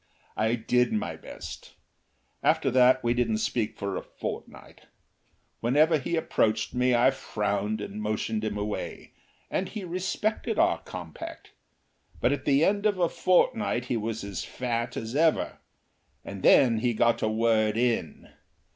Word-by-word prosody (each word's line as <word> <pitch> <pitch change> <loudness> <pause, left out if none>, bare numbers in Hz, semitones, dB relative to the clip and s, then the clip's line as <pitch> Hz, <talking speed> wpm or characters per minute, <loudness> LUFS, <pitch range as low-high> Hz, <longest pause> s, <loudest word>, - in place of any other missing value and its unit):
I 110 +2 +1
did 125 +1 +1
my 110 - -2
best. - - -10 0.7
After - - +2
that 130 +1 +5
we 120 0 +2
didn't 120 -3 +1
speak 110 0 -1
for 100 -1 -3
a - - -3
fortnight. - - -8 0.7
Whenever 150 +7 +3
he 155 +5 -2
approached 110 -8 0
me 125 0 +2
I 125 +3 +5
frowned 105 -4 -2
and 105 +1 -6
motioned 110 0 -2
him 105 -1 -2
away, 105 0 -5 0.4
and 185 0 -1
he 215 -3 -6
respected 190 +5 -2
our - - +3
compact, 85 -4 -9 0.7
but 120 - +2
at 140 -1 -2
the 140 +2 +4
end 205 +2 +2
of 205 -2 0
a 175 -2 +2
fortnight 185 - +1
he 125 - -1
was 110 -1 -3
as 100 -3 -4
fat 120 -2 -3
as 115 +3 -5
ever. 160 +1 +2 0.7
And 100 -1 -7
then 115 +1 +5
he 120 0 0
got 115 +1 +2
a 110 - +1
word 110 -1 +2
in. 120 -1 -1
120 Hz, 150 wpm, -27 LUFS, 110-140 Hz, 0.7 s, that